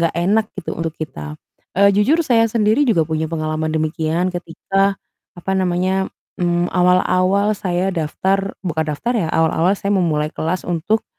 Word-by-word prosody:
enggak 165 -1 +1
enak 205 +5 +2
gitu 190 - -5
untuk 165 -1 -3
kita. 75 - -6 0.4
Eee, 200 +1 +5
jujur 240 +12 +3
saya 230 -4 +3
sendiri 220 +5 +2
juga 170 -8 +3
punya 160 0 -2
pengalaman 155 -1 -2
demikian. 160 +3 -1
Ketika, 195 +3 -1 0.4
apa 175 +2 -3
namanya? 185 +1 0 0.3
Mmm, 175 0 +1
awal-awal 185 +3 +3
saya 185 -1 -1
daftar 190 +4 -1
bukan 160 -3 -1
daftar 150 +12 -2
ya. 180 -8 0
Awal-awal 165 +3 +2
saya 200 +1 -2
memulai 160 -6 +1
kelas 170 +3 -2
untuk, 175 +6 0
180 Hz, 150 wpm, -19 LUFS, 160-195 Hz, 0.4 s, Eee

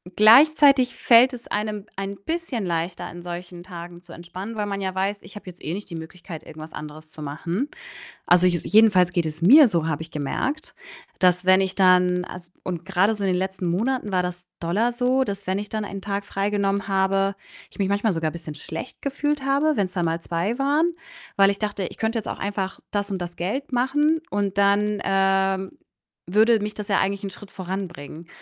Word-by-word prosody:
gleichzeitig 270 +3 +6
fällt 245 +2 +5
es 240 -1 -9
einem 210 -1 -3
ein 195 0 -4
bisschen 260 - -3
leichter, 170 +1 -2
an 175 0 -8
solchen 175 0 -7
Tagen 175 -1 -9
zu 175 -1 -16
entspannen, 185 +6 -8
weil 210 -1 -1
man 200 -1 -3
ja 190 -1 -3
weiß: 200 +2 -1
„Ich 190 +3 -14
habe 205 - -10
jetzt 180 -1 -11
eh 160 - -3
nicht 205 +1 -6
die 170 - -7
Möglichkeit, 165 0 -9
irgendwas 155 0 -10
anderes 155 +1 -9
zu 155 - -11
machen.“ 170 - -3 0.6
Also 180 +1 +5
je 175 -3 +2
jedenfalls 205 -4 +5
geht 170 -3 0
es 155 +1 -5
mir 270 - +8
so, 165 -4 0
habe 160 0 -2
ich 160 - -10
gemerkt, 260 - -3 0.4
dass 180 0 +3
wenn 185 +1 +6
ich 190 0 -2
dann 180 -1 +4
as 175 0 -10
und 175 -2 -5
grade 195 +3 +2
so 205 -1 -4
in 190 - +2
den 180 - +1
letzten 190 -1 -3
Monaten 215 +3 -1
war 180 -1 +2
das 180 0 -6
doller 205 +8 +1
so, 255 +2 +1
dass 200 -2 -5
wenn 190 +1 0
ich 205 0 -6
dann 215 -1 -2
einen 195 -1 -7
Tag 200 0 -3
freigenommen 200 0 -1
habe, 195 0 +1 0.4
ich - - -18
mich 195 -1 +1
manchmal 205 +1 +1
sogar 165 -2 -1
bisschen 160 -2 -8
schlecht 160 - -7
gefühlt 290 0 -1
habe, 285 +3 +2
wenn's 190 -2 -1
dann 175 -2 0
mal 165 0 -1
2 175 +10 -2
waren, 300 +5 +2 0.4
weil 195 0 +6
ich 200 - -3
dachte: 205 -3 -2
„Ich - - -7
könnte 225 +1 -1
jetzt 215 - -5
auch - - -4
einfach 195 -1 -3
das 205 0 -1
und 190 - -2
das 175 -1 -6
Geld 260 +11 -3
machen“, 295 +6 +2
und 200 -1 -1
dann, 205 +1 +2
ähm, 195 0 +1 0.6
würde 220 +2 +4
mich 210 0 -4
das 210 -1 -6
ja 195 - +2
eigentlich 200 +1 -1
'n 195 - -3
Schritt 195 +1 -12
voranbringen. 175 -4 -6
195 Hz, 205 wpm, -23 LUFS, 175-215 Hz, 0.6 s, mir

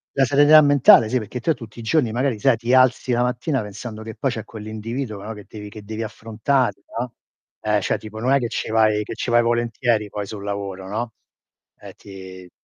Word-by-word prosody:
la 135 - +4
serenità 145 +3 +7
mentale, 145 -6 +6
sì, 125 +3 0
perché 110 +3 -6
te 160 +7 +1
tutti 115 -4 -12
i - - -6
giorni 115 +1 +1
magari, 125 0 0
sai, 125 +2 +3
ti 120 +2 -1
alzi 130 -1 +4
la 120 +1 +2
mattina 125 +3 -1
pensando 110 +2 -8
che 110 0 -7
poi 135 - -1
c'è 110 -3 -4
quell'individuo, 110 +1 -6
no, 105 +2 -6
che 105 -2 -11
devi 105 -1 -9
che 105 0 -11
devi 110 +2 -4
affrontare, 115 +4 -1 0.2
no. 120 0 -4 0.5
Eh, 105 -1 +2
cioè - - -1
tipo 110 0 -9
non 125 +4 +1
è 140 - +4
che 120 -3 -2
ce' - - -3
vai 110 -1 +3
che - - -7
ce' - - -4
vai 120 0 +5
volentieri 120 -2 0
poi 105 0 -5
sul 100 0 -8
lavoro, 100 -2 -5
no, 115 +2 -3 0.7
ehm, - - -11
ti 95 -2 -11
115 Hz, 215 wpm, -22 LUFS, 105-125 Hz, 0.7 s, serenità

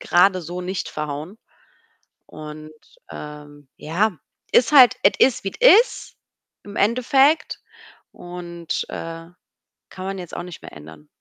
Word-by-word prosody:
grade 185 +1 +3
so 175 +2 -7
nicht 185 +1 -4
verhauen. 150 +5 -6 0.9
Und, 155 0 -10 0.4
ähm, 145 -1 -11
ja, 180 +4 -1 0.3
ist 240 - +4
halt 260 -5 +8
es 195 - +6
ist, 260 -2 +3
wie 195 - -4
es - - +7
ist - - -12 0.5
im 205 0 -11
Endeffekt 265 +7 +2 0.5
und, 175 -1 -6
äh, 165 0 -7 0.6
kann 185 - -9
man 195 0 -4
jetzt 180 -3 -8
auch - - -5
nicht 180 -2 -10
mehr - - -11
ändern. 75 0 -13
175 Hz, 135 wpm, -21 LUFS, 155-200 Hz, 0.9 s, halt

